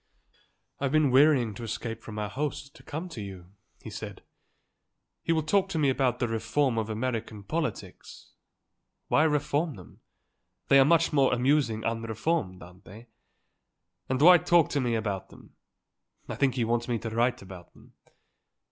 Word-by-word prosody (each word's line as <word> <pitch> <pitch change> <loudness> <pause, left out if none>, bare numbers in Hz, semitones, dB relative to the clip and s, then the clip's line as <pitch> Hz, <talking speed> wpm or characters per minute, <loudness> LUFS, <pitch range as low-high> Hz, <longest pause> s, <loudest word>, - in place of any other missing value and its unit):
"I've 135 -1 -1
been 155 -3 +3
wearying 130 -4 +4
to 110 - -9
escape 115 0 -5
from 110 -2 -9
our 105 0 -2
host 140 +4 -5
and - - -20
come 160 +5 -5
to 120 -10 -7
you," 95 -3 -10 0.3
he - - -8
said. - - -8 1.0
"He - - -2
will 160 -1 +1
talk 195 +4 +1
to 185 - -3
me 145 -3 +3
about 130 -2 0
the 120 - -1
reform 115 +3 0
of 110 0 -3
American 110 -2 -4
politics. 155 +9 -5 0.8
Why 155 - +4
reform 150 0 0
them? 90 - -15 0.7
They 135 - +7
are 135 - +6
much 165 +2 +3
more 140 -3 +3
amusing 125 -3 +1
unreformed, 115 - -2
aren't 90 +3 -16
they? 110 +6 -13 1.0
And 130 0 0
why 175 +4 +8
talk 170 +1 +3
to 140 - 0
me 120 -2 0
about 100 -4 -3
them. - - -17 0.7
I - - -5
think 135 -3 +1
he 120 -3 0
wants 120 +1 -1
me 120 -2 0
to 115 0 -6
write 120 0 0
about 95 -2 -12
them. - - -20
125 Hz, 165 wpm, -27 LUFS, 110-145 Hz, 1.0 s, why